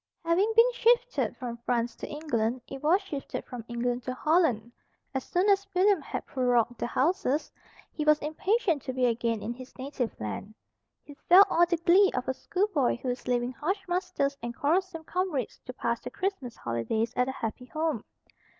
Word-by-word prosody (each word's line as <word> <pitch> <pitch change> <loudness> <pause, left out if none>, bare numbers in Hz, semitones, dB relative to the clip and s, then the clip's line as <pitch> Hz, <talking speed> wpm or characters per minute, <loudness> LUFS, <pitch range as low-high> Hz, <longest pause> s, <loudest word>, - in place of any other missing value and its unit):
Having 370 +6 +3
been 475 +2 +6
shifted - - +2
from 240 -2 -5
France 235 0 -1
to - - -6
England, 255 -6 -1
it 270 - -8
was 325 +6 +4
shifted 295 -8 -5
from 245 -2 -7
England 240 +1 -1
to 255 +1 -4
Holland. 295 -8 +2 0.4
As 265 -1 -2
soon 360 +3 +1
as 395 -1 +3
William 385 -1 +4
had - - -5
prorogued 245 -2 +1
the - - -1
Houses, 290 +1 0 0.4
he 305 - -3
was 305 0 +5
impatient 335 - 0
to 260 - -5
be 255 0 +1
again 230 -2 0
in 235 - -3
his 255 +1 -12
native 260 -3 -4
land. 110 - -5 0.5
He 290 - -12 0.2
felt 375 +3 +10
all 345 +1 +4
the 345 0 +1
glee 365 +4 +5
of 250 - -2
a 260 - +1
schoolboy 360 -4 0
who 255 +1 -4
is 245 +1 -4
leaving 245 0 +1
harsh 380 - -3
masters 350 -6 -1
and 240 0 -5
quarrelsome 330 +4 0
comrades 335 - -2
to 250 - -5
pass 235 -2 -1
the 250 - -6
Christmas 285 - -3
holidays 220 - -2
at 250 +1 +1
a - - -3
happy 235 +1 -5
home. 310 -4 -2
275 Hz, 185 wpm, -28 LUFS, 240-355 Hz, 0.5 s, felt